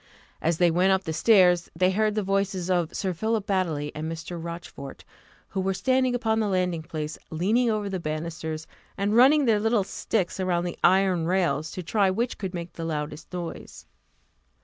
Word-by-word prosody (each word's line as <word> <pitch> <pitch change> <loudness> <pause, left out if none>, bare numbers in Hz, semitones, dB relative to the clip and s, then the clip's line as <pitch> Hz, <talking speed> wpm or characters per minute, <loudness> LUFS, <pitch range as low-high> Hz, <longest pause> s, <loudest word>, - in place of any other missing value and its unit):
As 165 0 +1
they 175 -1 +4
went 180 +3 +3
up 190 0 +2
the 160 - -3
stairs, 180 -1 +4
they 185 +2 +3
heard 215 +2 +1
the 215 - 0
voices 195 -2 -1
of 175 -3 +1
Sir 190 -2 -2
Philip 220 +3 -1
Baddely 170 -8 -1
and 155 +2 -4
Mr. 165 +1 -6
Rochfort, 170 -5 -8 0.4
who 190 - -2
were 190 0 0
standing 255 +2 +2
upon 225 -2 +1
the 215 - +1
landing 180 -4 0
place, 155 -1 -5
leaning 215 +10 +1
over 215 -2 -1
the 190 -2 -3
banisters, 155 0 -4 0.3
and 200 +2 0
running 275 +4 +6
their 220 -3 +3
little 225 -1 +2
sticks 190 -1 -2
along 180 -2 0
the 175 - -5
iron 185 -3 +3
rails, 165 -5 +1
to 185 - -5
try 200 +2 +2
which 230 +6 -2
could 190 -2 -4
make 170 0 -6
the 165 - -6
loudest 155 -1 -4
noise. 175 -2 -7
185 Hz, 185 wpm, -26 LUFS, 165-205 Hz, 0.4 s, running